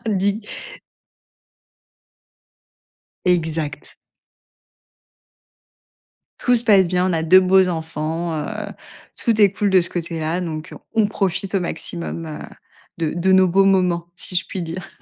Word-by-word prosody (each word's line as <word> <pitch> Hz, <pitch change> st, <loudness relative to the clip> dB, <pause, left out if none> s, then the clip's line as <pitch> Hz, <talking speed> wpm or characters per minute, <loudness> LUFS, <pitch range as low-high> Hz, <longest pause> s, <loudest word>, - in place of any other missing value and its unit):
Dis! 205 Hz, +1 st, 0 dB, 2.8 s
Exact. 160 Hz, -4 st, -1 dB, 2.4 s
Tout 245 Hz, -, +3 dB
se 240 Hz, 0 st, +2 dB
passe 195 Hz, -6 st, +5 dB
bien, 180 Hz, +1 st, +1 dB
on -, -, 0 dB
a 160 Hz, -, 0 dB
2 170 Hz, +4 st, +7 dB
beaux 190 Hz, 0 st, +4 dB
enfants, 160 Hz, 0 st, -3 dB
heu, 150 Hz, -1 st, -4 dB, 0.6 s
tout 230 Hz, -3 st, +1 dB
est 200 Hz, -, +6 dB
cool 205 Hz, +1 st, -1 dB
de 190 Hz, -2 st, +5 dB
ce 170 Hz, -, -1 dB
côté-là, 165 Hz, 0 st, -3 dB
donc 160 Hz, -3 st, -5 dB, 0.2 s
on 220 Hz, -2 st, +3 dB
profite 195 Hz, -1 st, -2 dB
au 195 Hz, -, +2 dB
maximum, 170 Hz, -1 st, -5 dB
heu, 155 Hz, -1 st, -7 dB, 0.6 s
de 160 Hz, -2 st, -1 dB
de 180 Hz, +2 st, +1 dB
nos 190 Hz, 0 st, +6 dB
beaux 195 Hz, +2 st, +3 dB
moments 180 Hz, -3 st, +2 dB
si 180 Hz, -, -3 dB
je 180 Hz, -, 0 dB
puis 185 Hz, -, -5 dB
dire. 170 Hz, +2 st, -6 dB
180 Hz, 130 wpm, -20 LUFS, 165-190 Hz, 2.8 s, 2